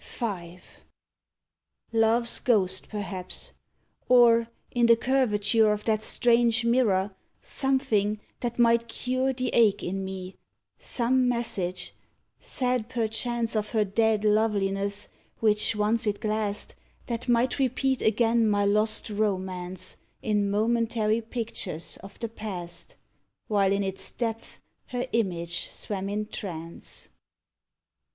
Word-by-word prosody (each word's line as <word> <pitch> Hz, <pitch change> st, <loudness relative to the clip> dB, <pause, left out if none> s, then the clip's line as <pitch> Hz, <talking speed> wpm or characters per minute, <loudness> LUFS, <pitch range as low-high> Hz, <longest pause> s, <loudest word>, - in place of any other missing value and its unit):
V. 180 Hz, -7 st, -5 dB, 1.4 s
Love's 230 Hz, +1 st, +3 dB
ghost, 190 Hz, -6 st, +1 dB
perhaps. 190 Hz, -3 st, -4 dB, 0.6 s
Or, 235 Hz, -2 st, +6 dB, 0.2 s
in 240 Hz, -1 st, +3 dB
the 230 Hz, -, +7 dB
curvature 225 Hz, -4 st, +2 dB
Of 210 Hz, 0 st, -2 dB
that 215 Hz, -1 st, +1 dB
strange 235 Hz, 0 st, +3 dB
mirror, 210 Hz, -5 st, +2 dB, 0.2 s
something 215 Hz, -6 st, 0 dB, 0.2 s
that 240 Hz, -1 st, -3 dB
might 235 Hz, -1 st, +4 dB
cure 255 Hz, +3 st, -1 dB
The 255 Hz, -1 st, -2 dB
ache 220 Hz, -4 st, +3 dB
in 195 Hz, +2 st, -2 dB
me 190 Hz, -1 st, -6 dB, 0.4 s
some 250 Hz, +1 st, +1 dB
message, 225 Hz, -7 st, -1 dB, 0.5 s
said 250 Hz, -3 st, -1 dB
perchance 235 Hz, 0 st, 0 dB
Of 215 Hz, +1 st, -1 dB
her 215 Hz, -2 st, +3 dB
dead 215 Hz, +1 st, +1 dB
loveliness, 200 Hz, -2 st, +1 dB, 0.3 s
which 210 Hz, 0 st, +2 dB
once 215 Hz, +2 st, +1 dB
it 205 Hz, -1 st, 0 dB
glassed, 215 Hz, -1 st, -1 dB, 0.3 s
That 235 Hz, +1 st, -4 dB
might 240 Hz, +3 st, +2 dB
repeat 265 Hz, 0 st, +1 dB
again 225 Hz, +1 st, +3 dB
my 205 Hz, -1 st, +2 dB
lost 215 Hz, +2 st, +2 dB
romance 185 Hz, -3 st, -2 dB, 0.3 s
In 210 Hz, -2 st, +1 dB
momentary 225 Hz, +1 st, +1 dB
pictures 220 Hz, -8 st, -4 dB
of 195 Hz, +1 st, -12 dB
the 230 Hz, -, -3 dB
past, 190 Hz, -6 st, -6 dB, 0.5 s
While 200 Hz, -3 st, +2 dB
in 200 Hz, 0 st, +1 dB
its 190 Hz, 0 st, -4 dB
depths 225 Hz, -2 st, -4 dB, 0.3 s
her 250 Hz, 0 st, -2 dB
image 170 Hz, -6 st, -1 dB
swam 195 Hz, -1 st, -4 dB
in 210 Hz, +1 st, -2 dB
trance. 170 Hz, -6 st, -6 dB
215 Hz, 115 wpm, -27 LUFS, 200-235 Hz, 1.4 s, the